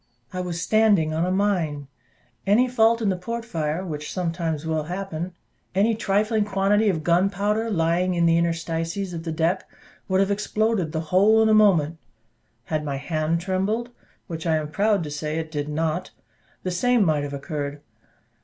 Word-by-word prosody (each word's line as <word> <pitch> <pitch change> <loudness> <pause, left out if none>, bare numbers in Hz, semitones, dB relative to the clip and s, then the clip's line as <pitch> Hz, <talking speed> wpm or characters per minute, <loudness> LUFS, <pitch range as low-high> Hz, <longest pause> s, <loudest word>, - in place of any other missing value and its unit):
I 185 - -2
was 175 -2 -4
standing 205 -6 +3
on 165 +3 0
a - - 0
mine; 175 -8 0 0.6
any 225 +6 +4
fault 230 -1 +3
in 205 - +2
the 190 - +1
port 230 +6 -5
fire, 165 -4 -2
which 150 -3 -5
sometimes 165 -3 -2
will 160 -1 -1
happen, 180 0 -4 0.4
any 210 +4 +3
trifling 215 +1 +1
quantity 205 +1 +2
of 160 -5 -1
gunpowder 200 +6 +1
lying 175 -1 +1
in 170 -1 +2
the 165 0 +4
interstices 165 +2 -1
of 165 0 -6
the 165 - -2
deck, 165 +4 0 0.4
would 190 0 +2
have 195 +1 +2
exploded 210 -3 0
the 160 -1 -2
whole 215 +4 +5
in 220 - +3
a - - +5
moment: 170 -7 +4 0.6
had 155 +3 -2
my 140 -2 -3
hand 155 +3 -1
trembled, 200 +6 -1 0.3
which 165 -2 -5
I 160 - +3
am 155 -1 -2
proud 205 0 +2
to 150 - -6
say 150 +1 -3
it 160 -1 -4
did 145 -1 -3
not, 160 +4 -1 0.5
the 185 - -2
same 240 +4 +3
might 155 -3 +2
have 145 0 -5
occurred. 145 0 -4
180 Hz, 175 wpm, -24 LUFS, 160-205 Hz, 0.6 s, whole